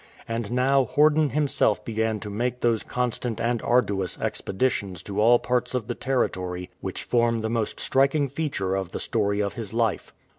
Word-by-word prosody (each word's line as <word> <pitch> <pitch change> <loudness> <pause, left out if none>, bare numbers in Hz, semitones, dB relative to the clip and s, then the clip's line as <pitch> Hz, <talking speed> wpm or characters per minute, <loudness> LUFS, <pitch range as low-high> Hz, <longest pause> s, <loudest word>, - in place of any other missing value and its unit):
And 115 -2 -3
now 130 +2 +3
Horden 150 +3 +3
himself 135 -6 +1
began 110 -1 -1
to 105 - -6
make 125 +4 -2
those 115 -2 +2
constant 125 -2 -2
and 120 -1 0
arduous 100 -7 +1
expeditions 100 -5 -1
to 100 +1 -2
all 120 +2 +6
parts 125 +1 -1
of 125 -4 -1
the 120 - -2
territory 90 -9 -2
which 95 - -4
form 115 -1 +1
the 110 0 -2
most 115 -2 -1
striking 140 +2 +2
feature 135 -10 -2
of 95 -2 -3
the - - -3
story 105 -3 0
of 100 -1 -2
his 110 -3 -6
life. 115 -2 0
115 Hz, 175 wpm, -25 LUFS, 105-125 Hz, -, all